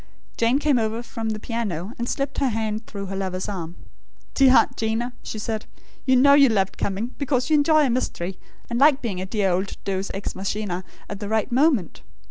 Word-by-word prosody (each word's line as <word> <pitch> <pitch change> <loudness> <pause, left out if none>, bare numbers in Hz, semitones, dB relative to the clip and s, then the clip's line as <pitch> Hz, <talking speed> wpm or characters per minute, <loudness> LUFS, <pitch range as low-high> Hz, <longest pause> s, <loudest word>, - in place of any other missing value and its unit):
Jane 235 +3 +2
came 290 -3 +2
over 225 +1 -1
from 225 -2 -4
the 215 -1 -3
piano, 215 -4 -3
and 235 - -2
slipped 275 0 -2
her 275 - +2
hand 220 -1 -2
through 200 -2 -6
her 195 0 -5
lover's 185 -1 -3
arm. 175 -4 -5 0.6
"Dear 265 -1 +6
Aunt - - +3
'Gina," 225 +2 -1
she - - -6
said; 220 0 -4 0.4
"you 260 - +5
know 280 +3 +6
you 280 -2 +7
loved 195 -4 0
coming; 205 +5 -2
because 265 0 0
you - - +5
enjoy 300 +1 +4
a - - +1
mystery, 190 -7 -2 0.3
and 235 0 -2
like 285 -1 +5
being 195 -6 -3
a 190 - -4
dear 200 -2 +1
old 190 +3 -2
'deus 195 0 -2
ex 195 - -4
machina,' 195 -1 -3 0.2
at 205 - -6
the 205 -1 -5
right 220 +3 0
moment. 260 - +2
220 Hz, 205 wpm, -23 LUFS, 195-255 Hz, 0.6 s, you